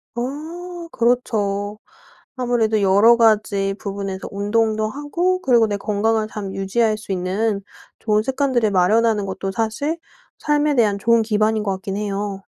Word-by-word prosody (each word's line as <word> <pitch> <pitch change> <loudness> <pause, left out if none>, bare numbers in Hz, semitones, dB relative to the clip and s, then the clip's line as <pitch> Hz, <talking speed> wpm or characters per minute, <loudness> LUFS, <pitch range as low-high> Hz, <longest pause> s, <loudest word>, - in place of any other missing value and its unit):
아 335 +7 -6
그렇죠. 210 -4 0 0.6
아무래도 235 -4 +1
여러 200 +4 +6
가지 210 -4 +2
부분에서 195 -2 -5
운동도 215 +2 0
하고 340 +8 -1
그리고 240 -8 +4
내 205 -1 -2
건강을 215 +2 0
잘 205 -3 -6
유지할 215 +3 0
수 210 -2 -8
있는 195 +3 -1 0.4
좋은 215 -1 +1
습관들을 260 -4 +1
마련하는 210 +3 +2
것도 195 0 -4
사실 230 - -2 0.4
삶에 295 0 +1
대한 210 -5 +3
좋은 230 +3 +3
기반인 215 0 +1
것 200 - -1
같긴 190 +1 -5
해요. 200 -1 -3
215 Hz, 300 characters per minute, -21 LUFS, 200-240 Hz, 0.6 s, 여러